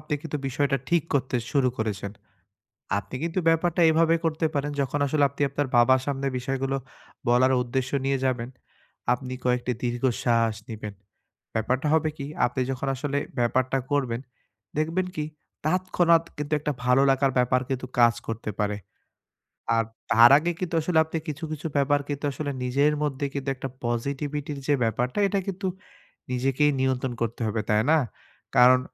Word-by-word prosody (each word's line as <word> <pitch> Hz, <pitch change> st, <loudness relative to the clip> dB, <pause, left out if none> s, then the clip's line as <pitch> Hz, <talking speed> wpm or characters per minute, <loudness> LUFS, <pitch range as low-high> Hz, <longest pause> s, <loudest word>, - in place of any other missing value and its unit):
আপনি 150 Hz, -1 st, -3 dB
কিন্তু 155 Hz, -2 st, -4 dB
বিষয়টা 135 Hz, +1 st, +1 dB
ঠিক 170 Hz, -2 st, +3 dB
করতে 130 Hz, -2 st, +1 dB
শুরু 135 Hz, -3 st, +3 dB
করেছেন। 100 Hz, -2 st, -3 dB, 0.9 s
আপনি 100 Hz, +4 st, -8 dB
কিন্তু 165 Hz, +2 st, -1 dB
ব্যাপারটা 165 Hz, +1 st, +2 dB
এভাবে 165 Hz, +1 st, +4 dB
করতে 160 Hz, 0 st, +1 dB
পারেন 145 Hz, 0 st, -1 dB
যখন 140 Hz, +1 st, 0 dB
আসলে 145 Hz, +1 st, +2 dB
আপনি 140 Hz, -, -18 dB
আপনার 145 Hz, +1 st, -1 dB
বাবার 130 Hz, +2 st, +5 dB
সামনে 140 Hz, -1 st, -2 dB
বিষয় 135 Hz, +2 st, -2 dB
গুলো 135 Hz, 0 st, 0 dB, 0.5 s
বলার 125 Hz, +2 st, +4 dB
উদ্দেশ্য 130 Hz, +2 st, -2 dB
নিয়ে 135 Hz, 0 st, +1 dB
যাবেন, 125 Hz, -2 st, 0 dB, 0.6 s
আপনি 125 Hz, +1 st, -3 dB
কয়েকটি 125 Hz, 0 st, +1 dB
দীর্ঘ 120 Hz, 0 st, -2 dB, 0.2 s
শ্বাস 115 Hz, -2 st, +2 dB
নিবেন। 105 Hz, -2 st, -6 dB, 0.6 s
ব্যাপারটা 125 Hz, +6 st, 0 dB
হবে 160 Hz, 0 st, +3 dB
কি, 140 Hz, -, -5 dB, 0.2 s
আপনি 125 Hz, +1 st, -2 dB
যখন 135 Hz, +1 st, -3 dB
আসলে 140 Hz, +1 st, -2 dB, 0.2 s
ব্যাপারটা 130 Hz, +2 st, +1 dB
করবেন 130 Hz, -5 st, 0 dB, 0.6 s
দেখবেন 165 Hz, +4 st, 0 dB
কি 150 Hz, -, -2 dB, 0.4 s
তৎক্ষণাৎ 170 Hz, -1 st, +3 dB
কিন্তু 150 Hz, +1 st, -3 dB
একটা 150 Hz, 0 st, -1 dB
ভালো 125 Hz, +2 st, +4 dB
লাগার 135 Hz, 0 st, +3 dB
ব্যাপার 125 Hz, +1 st, +3 dB
কিন্তু 130 Hz, -1 st, -2 dB
কাজ 120 Hz, -1 st, +6 dB
করতে 115 Hz, -1 st, -3 dB
পারে। 105 Hz, 0 st, 0 dB, 1.0 s
আর 115 Hz, -, +3 dB, 0.3 s
তার 115 Hz, +1 st, +8 dB
আগে 170 Hz, +3 st, 0 dB
কিন্তু 175 Hz, -2 st, -2 dB
আসলে 160 Hz, +1 st, 0 dB
আপনি 160 Hz, +1 st, -4 dB
কিছু, 155 Hz, +1 st, -5 dB
কিছু 155 Hz, +1 st, -4 dB
ব্যাপার 145 Hz, +1 st, +3 dB
কিন্তু 145 Hz, 0 st, -3 dB
আসলে 145 Hz, +2 st, -3 dB
নিজের 140 Hz, +4 st, +2 dB
মধ্যে 145 Hz, -1 st, -1 dB
কিন্তু 140 Hz, -1 st, -3 dB
একটা 135 Hz, -, -5 dB, 0.2 s
পজিটিভিটির 140 Hz, +4 st, -2 dB
যে 145 Hz, -, +4 dB
ব্যাপারটা 120 Hz, -, 0 dB
এটা 195 Hz, 0 st, 0 dB
কিন্তু 195 Hz, 0 st, -3 dB, 0.6 s
নিজেকেই 135 Hz, +4 st, +2 dB
নিয়ন্ত্রন 130 Hz, -1 st, 0 dB
করতে 115 Hz, +1 st, -2 dB
হবে 110 Hz, 0 st, -1 dB
তাই 105 Hz, 0 st, +4 dB
না? 160 Hz, -, +6 dB, 0.6 s
কারন 125 Hz, +1 st, +7 dB
135 Hz, 160 wpm, -26 LUFS, 125-150 Hz, 1.0 s, তার